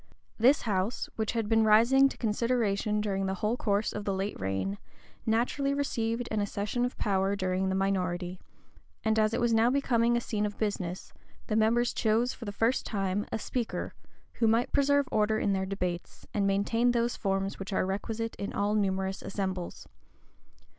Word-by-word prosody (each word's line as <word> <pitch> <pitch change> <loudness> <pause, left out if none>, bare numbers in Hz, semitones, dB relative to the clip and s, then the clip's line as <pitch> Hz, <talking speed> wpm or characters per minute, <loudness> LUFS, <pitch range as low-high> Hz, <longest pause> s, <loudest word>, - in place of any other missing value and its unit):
This 260 +6 +5
house, 205 +1 -1
which 220 -1 -1
had 225 -3 -1
been 225 0 +4
rising 235 +6 +6
to - - -10
consideration 215 -2 0
during 195 -2 -1
the 190 - -1
whole 210 +5 0
course 205 -3 0
of 210 - -4
the 195 -1 -1
late 195 +2 -2
reign, 95 +1 -2 0.5
naturally 250 +5 +1
received 235 -4 -1
an 215 -1 0
accession 205 +4 -2
of 245 - -4
power 195 -1 +1
during 185 -1 0
the 190 - 0
minority; 180 -2 -1 0.7
and 220 0 +3
as 215 0 +3
it 230 - -1
was 240 -1 +2
now 225 +1 +4
becoming 240 -3 +2
a - - +2
scene 215 -3 -2
of 205 - -8
business, 190 -4 -3 0.3
the 215 - -1
members 235 +3 +3
chose 225 +3 +1
for 230 - -9
the 205 - -4
first 225 +5 +1
time 195 -1 -2
a - - 0
speaker, 235 +1 -3 0.5
who 230 - +4
might 230 +2 +2
preserve 285 0 +3
order 215 0 +2
in 200 - +1
their 190 0 -1
debates, 180 -3 -4
and 200 -3 +1
maintain 225 +5 +2
those 235 0 +1
forms 195 0 -2
which 195 +1 -6
are 190 - +1
requisite 225 +4 -3
in 200 - -4
all 205 +1 0
numerous 190 -2 0
assembles. 190 -3 -4
210 Hz, 180 wpm, -29 LUFS, 195-230 Hz, 0.7 s, rising